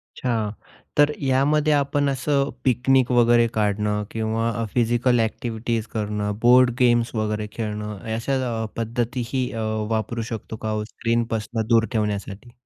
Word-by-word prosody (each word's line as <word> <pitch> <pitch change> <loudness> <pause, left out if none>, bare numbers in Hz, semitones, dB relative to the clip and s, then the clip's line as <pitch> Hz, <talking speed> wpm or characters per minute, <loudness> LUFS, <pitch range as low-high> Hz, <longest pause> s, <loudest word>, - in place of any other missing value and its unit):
अच्छा. 115 -4 -1 0.5
तर 145 0 +5
यामध्ये 145 +3 +3
आपण 145 0 +1
असं 140 +1 0
पिकनिक 130 +1 +3
वगैरे 120 -1 +5
काढणं 105 0 0
किंवा 115 +1 -1
अ, - - -1
फिजिकल 120 +1 +2
ॲक्टिव्हिटीज 115 0 -2
करणं, 105 -1 -2
बोर्ड 125 +1 +6
गेम्स 120 -1 +3
वगैरे 105 -1 -1
खेळणं 105 -2 -4 0.2
अशा 115 +4 -2 0.3
अ, - - -2
पद्धतीही 120 +2 -2
अ, 115 - -3 0.3
वापरू 115 +1 -1
शकतो 110 0 -5
का 110 - 0
हो 110 0 -1
स्क्रीनपासून 115 0 -2
दूर 115 -1 +4
ठेवण्यासाठी? 105 0 -3
115 Hz, 135 wpm, -23 LUFS, 110-125 Hz, 0.5 s, बोर्ड